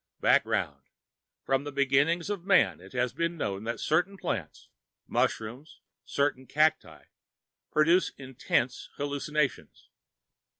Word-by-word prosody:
Background: - - +2 0.6
From 135 0 +1
the 145 - -6
beginnings 145 +7 +2
of 200 -4 -4
Man, 195 -1 +3
it 95 - -14
had 125 0 0
been 170 +3 -2
known 100 -6 -3
that 115 - -3
certain 180 +6 +1
plants 95 - -4 0.4
mushrooms, 120 +8 -2 0.3
certain 140 -2 -1
cacti 155 +1 +1 0.7
produced 165 +4 +3
intense 130 -1 -2
hallucinations. 145 0 -2
145 Hz, 110 wpm, -29 LUFS, 130-165 Hz, 0.7 s, Man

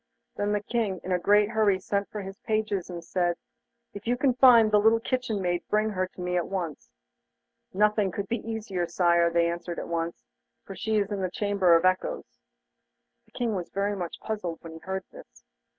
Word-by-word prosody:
Then 205 0 -1
the 210 -1 0
King 210 -5 -1
in 185 - -5
a 180 - +2
great 205 +3 +4
hurry 210 -4 +2
sent 200 +1 -2
for 210 - -5
his 195 +1 -9
pages 215 -4 -1
and 170 -1 -6
said: 175 -1 0 0.6
'If 205 +2 -9
you 245 +1 +1
can 260 0 +2
find 240 -4 +7
the 210 - +5
little 220 +2 +4
kitchen 245 -3 -2
maid, 175 -2 0
bring 215 +1 +2
her 185 -2 -1
to 180 - -12
me 180 0 -1
at 175 - -1
once.' 175 -6 -4 0.8
'Nothing 210 0 +2
could 200 +2 -4
be 235 - -1
easier, 210 -6 -3
Sire,' 170 0 +3
they 170 0 +2
answered, 170 0 -4
'for 170 +3 -6
she 220 +2 -1
is 205 0 0
in 200 -1 -2
the 185 - -1
Chamber 195 -2 +3
of 165 +2 +3
Echoes.' 185 - -1 0.9
The - - -29
King 235 -3 -1
was 180 -3 -4
very 200 +1 -1
much 175 -3 -5
puzzled 205 -7 -4
when 165 - -8
he 160 - -9
heard 190 +3 -4
this. - - -15
195 Hz, 200 wpm, -27 LUFS, 175-215 Hz, 0.9 s, find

